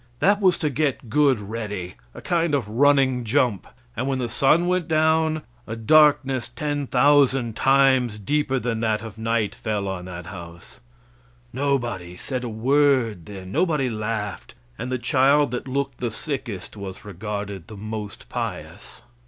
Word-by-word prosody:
That 200 +9 +3
was 185 -3 +4
to 150 -3 -1
get 135 -5 -1
good 140 -3 +4
ready 105 -4 -5 0.2
a - - -9
kind 170 -4 +1
of 125 -7 -1
running 130 +1 +3
jump; 110 -2 +1 0.3
and 130 - -2
when 135 -1 0
the 125 -2 -2
sun 140 +8 +3
went 180 -1 0
down, 160 -1 +2 0.2
a 115 - -4
darkness 135 0 +4
ten 145 -2 -2
thousand 130 -3 +3
times 130 -4 +3
deeper 135 +5 0
than 120 -3 -2
that 110 -1 0
of 110 -1 -9
night 110 -2 0
fell 105 -3 -3
on 95 -2 -4
that 90 -1 -8
house. 85 -3 -10 0.7
Nobody 120 -10 -2
said 130 +3 -4
a 120 - -3
word 120 - +2
then; 95 -2 -9
nobody 150 - +1
laughed; 110 -1 -4 0.2
and 125 - -5
the 130 - 0
child 135 +3 +3
that 125 +1 -4
looked 135 0 -2
the 120 - -1
sickest 115 - -5
was 100 -1 -8
regarded 100 -1 -5
the 110 - -10
most 105 0 -6
pious. - - -6
125 Hz, 155 wpm, -23 LUFS, 105-140 Hz, 0.7 s, was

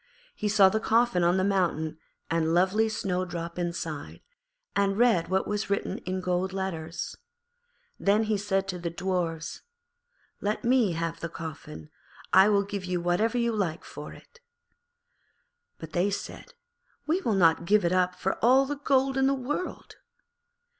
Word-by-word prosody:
He 210 - -2
saw 200 -2 +6
the 220 +3 +1
coffin 225 -5 +2
on 175 +2 +3
the 185 - +1
mountain 170 -5 0 0.3
and 165 0 +1
lovely 195 +5 +3
Snowdrop 180 -4 -3
inside, 170 -4 -4 0.5
and 200 0 +1
read 230 -8 +3
what 190 +2 0
was 210 0 -2
written 200 - -1
in 185 +1 -4
golden 185 +1 -1
letters. 165 -3 -4 0.8
Then 205 +2 +3
he 215 0 0
said 195 -1 -1
to 180 -1 -3
the 170 0 -3
Dwarfs, 170 -2 -3 0.8
'Let 210 +1 -1
me 240 -6 +3
have 165 0 -3
the 165 - -4
coffin; 140 - -8 0.4
I 190 +2 +7
will 200 -1 +3
give 200 -1 -5
you 180 -1 -1
whatever 180 +8 +1
you 235 -1 +1
like 175 -6 -2
for - - -9
it.' 475 - -16 1.4
But 160 -1 -10
they 180 +3 +2
said, 200 - -6 0.5
'We 330 +5 +1
will 225 - 0
not 165 -3 +4
give 205 +1 +3
it 170 - +2
up 180 0 +2
for 190 +3 -3
all 260 +3 +6
the 290 +1 -4
gold 270 -1 +1
of 265 0 +3
the 275 - +2
world.' 290 +7 -5
190 Hz, 160 wpm, -27 LUFS, 170-215 Hz, 1.4 s, I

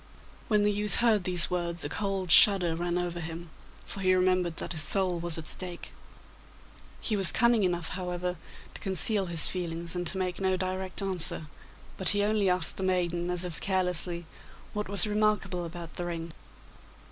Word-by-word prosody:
When 210 -2 +2
the 210 - +3
youth 205 0 +1
heard 220 -5 +2
these 180 -1 +1
words 175 -1 -2
a - - -1
cold 195 -4 -2
shudder 180 -5 +6
ran 175 +1 -2
over 175 -1 -3
him, 165 0 -7 0.3
for - - -6
he 185 -1 +3
remembered 185 -2 +1
that - - -5
his 160 -3 -1
soul 185 +2 +1
was 170 -1 -3
at 160 - -7
stake. 175 +1 -4 1.1
He 220 - 0
was 195 -5 +6
cunning 235 -1 +3
enough, 175 -3 -1
however, 180 -1 -3 0.4
to - - -6
conceal 195 +1 0
his 170 -2 0
feelings 170 -1 -1
and 175 -1 -3
to 190 - 0
make 185 -1 -3
no 190 -1 +1
direct 185 +1 -3
answer, 180 -4 +2 0.5
but 190 - +5
he 205 0 +3
only 210 -2 +1
asked 180 -3 -1
the - - -4
maiden, 175 -2 -1
as 180 0 +5
if 175 -2 -7
carelessly, 180 -2 -1 0.5
what 210 -2 -4
was 200 -3 +4
remarkable 210 -4 0
about 170 -1 -8
the 175 - -3
ring? 165 -1 -5
180 Hz, 180 wpm, -28 LUFS, 170-195 Hz, 1.1 s, shudder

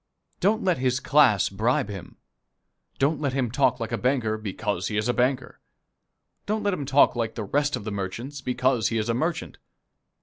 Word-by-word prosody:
Don't 215 +5 +2
let 180 -7 +1
his 130 0 +1
class 140 -10 +4
bribe 120 +8 0
him. 95 -4 -9 0.8
Don't 145 +3 +1
let 140 -3 -1
him 130 -4 -1
talk 130 -1 +2
like 115 0 -4
a 115 - -1
banker 125 -4 +1
because 105 -3 -3
he 105 - -2
is 110 +1 0
a 120 - +2
banker. 125 +1 -1 0.9
Don't 215 +1 -1
let 205 -1 +1
him 145 -7 -4
talk 140 -1 +4
like 115 -2 -2
the 110 - -3
rest 145 +8 0
of - - -6
the 110 - -4
merchants 115 +8 -5
because 125 -3 +1
he 115 - -1
is 110 +1 -1
a - - +2
merchant. 160 +7 -2
125 Hz, 195 wpm, -25 LUFS, 110-140 Hz, 0.9 s, class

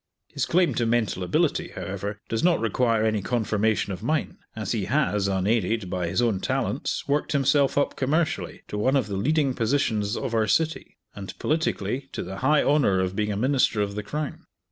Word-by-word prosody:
His - - -1
claim 180 0 +3
to 120 - 0
mental 115 -5 0
ability, 90 -1 0
however, 100 +2 -4
does 115 - -2
not 175 -1 +4
require 115 0 +1
any 110 -2 +1
confirmation 110 -2 0
of 90 - -7
mine, 150 +6 -1 0.2
as 110 -3 -3
he 110 -5 -1
has, 105 -5 +1
unaided, 100 +1 0
by 90 -2 -1
his 120 - +1
own 110 -5 +1
talents, - - -2
worked 145 +2 0
himself 140 0 +2
up 145 - +1
commercially 155 +4 -1
to 105 - -3
one 130 +6 +2
of 135 -5 +2
the 100 -1 -4
leading 140 +6 +1
positions 110 -4 0
of 120 - -3
our 110 -1 +2
city; 160 +8 0 0.2
and, 100 -2 -8
politically, 135 -4 -1
to - - -3
the 95 +2 -7
high 145 +7 +3
honour 140 -10 +3
of 95 0 -1
being 105 0 0
a 100 - -2
Minister 130 -1 +2
of 100 -1 0
the 105 - -3
Crown. 145 +7 -5
115 Hz, 190 wpm, -25 LUFS, 100-140 Hz, 0.2 s, not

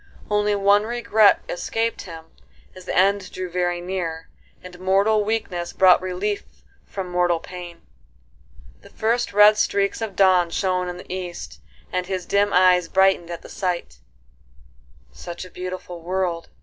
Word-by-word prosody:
Only 210 0 +2
one 200 +1 +4
regret 230 -3 +3
escaped 225 +6 -2
him 165 -3 -10 0.5
as 185 -1 -12
the - - -3
end 195 +1 +2
drew 185 -1 -6
very 175 0 -1
near, 175 -3 -4 0.3
and 180 -1 -11
mortal 200 +3 +2
weakness 205 -5 -3
brought 185 -1 +5
relief 185 +3 -3 0.4
from 190 -2 -5
mortal 175 -1 +1
pain. 175 0 -10 1.0
The - - -16
first 230 0 -1
red 210 +1 +6
streaks 200 +2 0
of 215 -4 -4
dawn 185 -3 +4
shone 180 0 -1
in 180 - -6
the 180 - -8
east, 180 -2 -7 0.3
and 180 0 -1
his 185 -2 -3
dim 200 +2 +1
eyes 180 -1 +4
brightened 190 -2 +2
at 170 -1 -7
the - - -10
sight; 175 - -4 1.1
"Such 175 - -8
a 185 - -14
beautiful 180 -1 -7
world!" 175 -1 -2
185 Hz, 150 wpm, -22 LUFS, 175-200 Hz, 1.1 s, red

